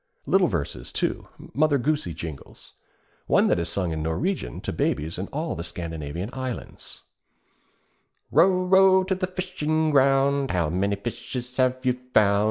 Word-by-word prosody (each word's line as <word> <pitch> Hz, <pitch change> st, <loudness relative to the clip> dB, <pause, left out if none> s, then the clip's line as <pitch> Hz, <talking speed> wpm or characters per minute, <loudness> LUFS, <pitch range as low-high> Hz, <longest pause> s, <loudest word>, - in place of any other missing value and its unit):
Little 190 Hz, -1 st, +4 dB
verses, 70 Hz, -, -4 dB
too, -, -, -2 dB, 0.3 s
Mother 145 Hz, +2 st, +3 dB
Goosey 135 Hz, -, -1 dB
jingles; 80 Hz, -4 st, -9 dB, 0.5 s
one -, -, +4 dB
that -, -, +2 dB
is 85 Hz, 0 st, -1 dB
sung 90 Hz, -2 st, -1 dB
in 80 Hz, -1 st, -3 dB
Norwegian 80 Hz, -, -2 dB
to -, -, -4 dB
babies 80 Hz, +4 st, -1 dB
in 95 Hz, -, -3 dB
all 155 Hz, +3 st, -3 dB
the 85 Hz, -, -5 dB
Scandinavian 85 Hz, +1 st, -5 dB
lands: 130 Hz, -1 st, -7 dB, 1.3 s
Row, 185 Hz, 0 st, +4 dB
row 190 Hz, 0 st, +6 dB
to 190 Hz, +1 st, -1 dB
the 185 Hz, 0 st, -2 dB
fishing 160 Hz, -4 st, -1 dB
ground, 135 Hz, 0 st, +3 dB
How 85 Hz, -4 st, 0 dB
many 100 Hz, +3 st, 0 dB
fishes 120 Hz, +4 st, -6 dB
have 130 Hz, 0 st, +1 dB
you 125 Hz, 0 st, +1 dB, 0.2 s
found? 100 Hz, -1 st, +5 dB
125 Hz, 150 wpm, -25 LUFS, -, 1.3 s, row